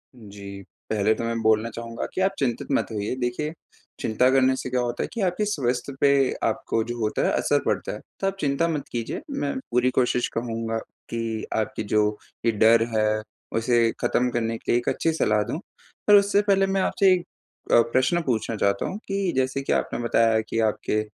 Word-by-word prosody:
जी। 100 -3 -10 0.3
पहले 110 0 +2
तो - - -4
मैं 115 0 -2
बोलना 110 +1 +3
चाहूँगा 115 0 -5
कि 190 - -1
आप 195 +1 +3
चिंतित 125 -4 -1
मत - - +1
होइए। 105 +3 -2
देखिए, 125 +6 -2 0.5
चिंता 125 +4 +2
करने 130 0 +4
से 130 - -5
क्या 125 0 0
होता 120 -1 -2
है - - -4
कि 230 - -3
आपके 185 +3 +1
स्वास्थ्य 135 -7 -1
पे 140 - +6 0.3
आपको 115 - 0
जो 120 +1 -5
होता 110 -1 0
है - - +2
असर - - +2
पड़ता - - -1
है। - - -6 0.2
तो 195 - 0
आप 195 - -1
चिंता 145 +2 +1
मत 150 -4 -2
कीजिए, 115 -2 -3
मैं 280 -1 -2 0.2
पूरी 125 +1 +3
कोशिश 125 -1 +2
कहूँगा 115 -1 -2 0.3
कि 115 -1 -3
आपकी 110 0 -1
जो 105 0 +1 0.3
ये 115 - +4
डर 115 +2 +5
है, 110 0 +2 0.4
उसे 115 0 +3
ख़त्म 125 +1 +2
करने 115 -1 -1
के - - -3
लिए 120 - +4
एक - - -2
अच्छी 165 - 0
सलाह 105 -9 +2
दूँ। 155 - -4 0.5
पर 205 - +8
उससे 200 0 +5
पहले 195 -1 +4
मैं 195 0 +1
आपसे 190 -1 +4 0.6
अ, - - +7
प्रश्न 130 +7 +2
पूछना 115 -5 -1
चाहता 100 -1 +1
हूँ 195 - -4
कि 195 -2 0
जैसे 130 +1 0
कि - - 0
आपने - - -1
बताया 115 -1 +3
कि 115 - -1
आपके 105 +1 -2
120 Hz, 200 wpm, -24 LUFS, 110-145 Hz, 0.6 s, पर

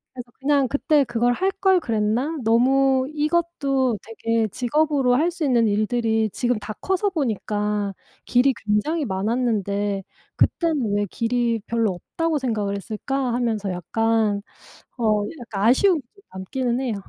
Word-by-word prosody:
그래서 245 -1 -8
'그냥 280 -1 +2
그때 285 +2 +2
그걸 240 +1 +1
할 380 +8 0
걸 380 -1 +4
그랬나? 230 +5 -1
너무 260 +3 +3
이것도 295 -6 0
되게 225 0 -1
직업으로 270 +2 +1
할 325 +7 +2
수 340 -2 -5
있는 240 -4 +3
일들이 220 +1 +1
지금 245 -3 0
다 215 - -6
커서 380 +2 0
보니까 210 - -1 0.3
길이 255 +2 +3
굉장히 270 +10 0
많았는데 205 -1 -1 0.3
그때는 285 - +1
왜 205 - +1
길이 235 -1 0
별로 230 -3 +1
없다고 320 - -2
생각을 215 -6 -1
했을까?' 240 +5 -3
하면서 220 -5 -1
약간 215 +3 0 0.6
어 215 -3 +2 0.2
약간 215 -5 -5
아쉬움이 345 +6 +4
좀 390 +12 -25
남기는 240 +6 -2
해요. 245 -5 -1
240 Hz, 295 characters per minute, -23 LUFS, 215-275 Hz, 0.6 s, 걸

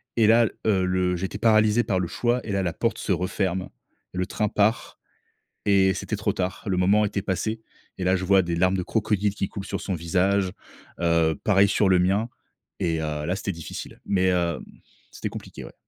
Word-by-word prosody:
et 110 -2 +4
là, 115 0 +5 0.2
heu, 95 -3 +3
le 90 0 +1
j'étais 95 +3 -4
paralysé 110 +1 +4
par 95 -5 0
le 90 - -1
choix 120 +5 0
et 105 - -4
là, 100 -1 0
la 85 -2 -1
porte - - -1
se - - -2
referme, 95 0 -1 0.4
le 90 0 -1
train 105 - -1
part 105 +3 0 0.7
et 95 -2 +4
c'était - - -3
trop - - -1
tard. 90 0 -3
Le 95 -2 0
moment 100 +4 +4
était 100 -1 -2
passé 110 +4 -2 0.4
et - - -2
là 95 +1 +3
je 95 0 -2
vois 95 0 +5
des 85 -1 -2
larmes 90 +2 +2
de - - 0
crocodile 105 -1 0
qui 95 - -1
coulent 100 0 -6
sur - - -4
son 95 - -3
visage. 90 +3 +1 0.5
Heu, 85 -2 +2
pareil 100 -1 +4
sur 100 0 +2
le 90 -1 +5
mien 100 +6 +1 0.5
et 80 -1 0
heu, 75 -1 -3
là 90 +3 -1
c'était 100 0 -3
difficile, 85 -2 -8
mais, 95 -2 +1
hem, 85 -2 0 0.5
c'était - - -5
compliqué, - - -9
ouais. - - -12
95 Hz, 205 wpm, -25 LUFS, 90-105 Hz, 0.7 s, là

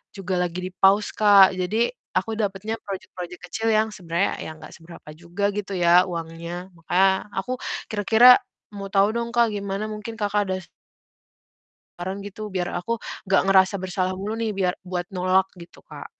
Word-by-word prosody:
juga 185 -2 -2
lagi 180 0 -2
di-pause, 195 +3 +3
Kak. 200 -3 +7
Jadi 215 +6 0 0.3
aku 225 - -1
dapatnya 210 +2 -2
project-project 185 -3 -8
kecil 225 0 -2
yang 220 0 +2
sebenarnya 175 +1 -1
ya - - -6
enggak - - -12
seberapa 165 -2 -14
juga 170 +5 -7
gitu 200 -1 -4
ya 175 0 +6
uangnya. 170 +2 -6
Makanya, 190 +4 +1
aku 195 +6 -2 0.4
kira-kira 220 +4 +7 0.3
mau 200 -1 -7
tahu 200 +1 +3
dong, 235 +1 -3
Kak, 235 -2 +4
gimana, 200 0 -3
mungkin 215 +2 -7
Kakak 205 -1 0
ada 185 - 0 1.4
saran 190 +3 -5
gitu 205 +2 -7
biar 180 -1 -1
aku 230 +7 -2 0.3
gak 195 - +3
ngerasa 190 0 +5
bersalah 185 0 -1
mulu 205 +4 -4
nih 225 -2 -2
biar 185 -2 -1
buat 180 -1 -2
nolak 185 0 +1
gitu, 170 -1 -14
Kak. - - -10
195 Hz, 160 wpm, -23 LUFS, 180-210 Hz, 1.4 s, Kak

